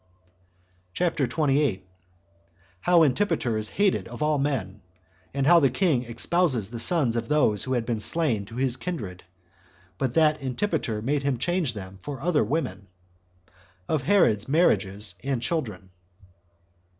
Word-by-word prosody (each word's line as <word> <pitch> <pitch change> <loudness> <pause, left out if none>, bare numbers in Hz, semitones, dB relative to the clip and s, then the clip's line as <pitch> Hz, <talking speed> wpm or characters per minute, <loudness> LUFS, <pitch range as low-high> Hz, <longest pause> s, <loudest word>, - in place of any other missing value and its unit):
CHAPTER 165 -6 0
28. 140 - 0 0.9
How 175 - +4
Antipater 155 - +1
Is 110 0 -1
Hated 200 - 0
Of - - -5
All 150 -1 +1
Men; 135 -8 -2 0.5
And 140 0 -1
How 170 +3 +7
The 140 -4 +3
King 130 -3 +1
Espouses 120 - 0
The 120 - -6
Sons 130 -2 +2
Of 115 - -2
Those 130 -9 +2
That 130 - -1
Had 120 -2 -1
Been 115 -2 -2
Slain 115 -2 +1
To 115 - -12
His 130 0 0
Kindred; 110 - -6 0.8
But 130 -2 -2
That 155 -2 +3
Antipater 130 - -2
Made 140 +3 0
Him 140 -2 -1
Change 170 0 0
Them 95 -1 -9
For 140 +6 -6
Other 155 -2 +1
Women. 105 - -3 1.0
Of 155 -3 0
Herod's 120 - +2
Marriages, 105 - +2
And 135 -2 -1
Children. 115 - -3
135 Hz, 140 wpm, -25 LUFS, 110-160 Hz, 1.0 s, How